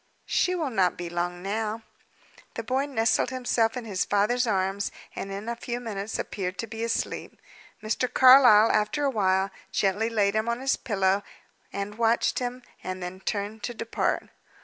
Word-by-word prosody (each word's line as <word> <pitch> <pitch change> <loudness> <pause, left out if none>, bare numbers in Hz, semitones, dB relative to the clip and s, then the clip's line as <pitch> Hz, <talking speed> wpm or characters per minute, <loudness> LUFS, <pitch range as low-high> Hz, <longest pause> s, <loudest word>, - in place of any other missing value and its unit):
"She 365 - +1
will 315 -6 -2
not 185 -6 +2
be 175 -1 -5
long 175 +1 -3
now." 215 +2 -2 0.7
The 230 - -4
boy 260 +5 0
nestled 225 -4 +1
himself 245 -3 0
in 245 - -5
his 195 -4 -1
father's 235 +5 +1
arms, 195 -1 0 0.2
and 195 - -5
in 200 +3 -6
a 235 - -2
few 240 +1 -4
minutes 215 -3 -4
appeared 185 -2 -4
to - - -3
be 225 0 -6
asleep. 230 - -3 0.4
Mr. 220 +4 -1
Carlyle, 255 -5 +8
after 215 +7 +1
a 280 - +2
while, 190 -3 +1 0.2
gently 200 +4 +1
laid 205 -3 +2
him 220 +2 0
on 235 +1 -1
his 270 +1 +1
pillow, 195 -2 +1 0.5
and 200 +2 -5
watched 230 0 +2
him, 250 0 -4 0.2
and 185 0 -5
then 180 +1 -6
turned 205 +2 -3
to 240 +3 -4
depart. 230 0 -1
220 Hz, 170 wpm, -26 LUFS, 195-235 Hz, 0.7 s, Carlyle